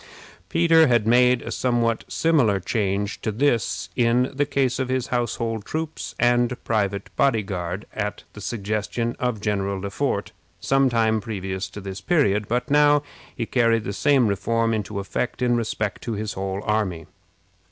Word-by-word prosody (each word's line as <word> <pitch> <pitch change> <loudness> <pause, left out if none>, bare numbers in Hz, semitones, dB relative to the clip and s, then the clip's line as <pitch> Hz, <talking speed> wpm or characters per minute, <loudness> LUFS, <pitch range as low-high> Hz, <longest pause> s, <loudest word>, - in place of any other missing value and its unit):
Peter 165 -1 +5
had 120 -4 +3
made 125 +1 +4
a - - -6
somewhat 120 -2 0
similar 135 -12 +2
change 100 +1 -1
to 110 - -1
this, 120 0 0
in 120 +1 +2
the 145 +1 0
case 135 -3 0
of 130 -1 -1
his 130 -1 0
household 115 -2 -1
troops 160 +4 -5
and 120 0 +2
private 100 -3 -1
body 115 -6 +2
guard, 90 0 -4
at 105 -1 -3
the 105 - -10
suggestion 110 +2 -2
of 125 -3 -1
General 100 -2 -1
Le 100 +1 -5
Fort, 100 -6 -1 0.3
some 135 +7 +2
time 110 -2 +2
previous 95 -4 -4
to 105 - -9
this 95 -1 -7
period, 105 - +2
but 125 +4 -1
now 145 0 +5 0.3
he 115 - -2
carried 115 -2 +2
the 100 - -4
same 140 +2 +3
reform 115 +3 0
into 105 -1 -3
effect 100 +5 -3
in 125 -1 +2
respect 105 -3 -2
to 115 - -4
his 105 0 -3
whole 95 +1 -3
army. 100 -7 -1
115 Hz, 165 wpm, -23 LUFS, 100-125 Hz, 0.3 s, Peter